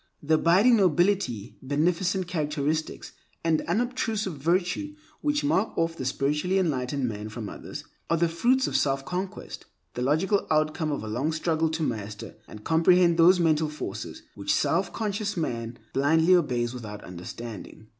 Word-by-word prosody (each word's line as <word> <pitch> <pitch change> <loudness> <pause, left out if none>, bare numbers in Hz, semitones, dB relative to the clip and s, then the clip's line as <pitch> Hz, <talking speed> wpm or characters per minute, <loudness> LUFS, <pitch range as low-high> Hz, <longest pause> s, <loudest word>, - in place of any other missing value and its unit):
The 155 +2 +1
abiding 190 +10 +5
nobility, 175 - +1
beneficent 175 +7 0
characteristics, 155 -2 -2 0.3
and 160 -1 +2
unobtrusive 225 -5 -1
virtue 180 - -1 0.3
which 295 0 0
mark 225 -7 +1
off 165 0 0
the 130 - -5
spiritually 150 +8 0
enlightened 140 -6 0
man 105 -1 -5
from 110 -1 -6
others, - - -8 0.3
are 165 - +2
the 170 +1 +3
fruits 245 +11 +2
of - - -3
self 135 -1 +1
conquest, 185 +5 -5 0.3
the 125 - -4
logical 160 - +1
outcome 155 0 +1
of 145 - -3
a - - -6
long 125 +9 -1
struggle 160 0 0
to 160 0 -2
master 105 -5 -4
and 105 - -11
comprehend 170 +2 +4
those 180 +2 +7
mental 155 -2 +2
forces 150 - -6
which - - -3
the - - +2
self - - +1
conscious 210 -2 -2
man 120 -7 -3 0.2
blindly 160 +6 +4
obeys 125 -8 0
without 105 -4 -8
understanding. 105 +5 -9
160 Hz, 155 wpm, -26 LUFS, 135-185 Hz, 0.3 s, those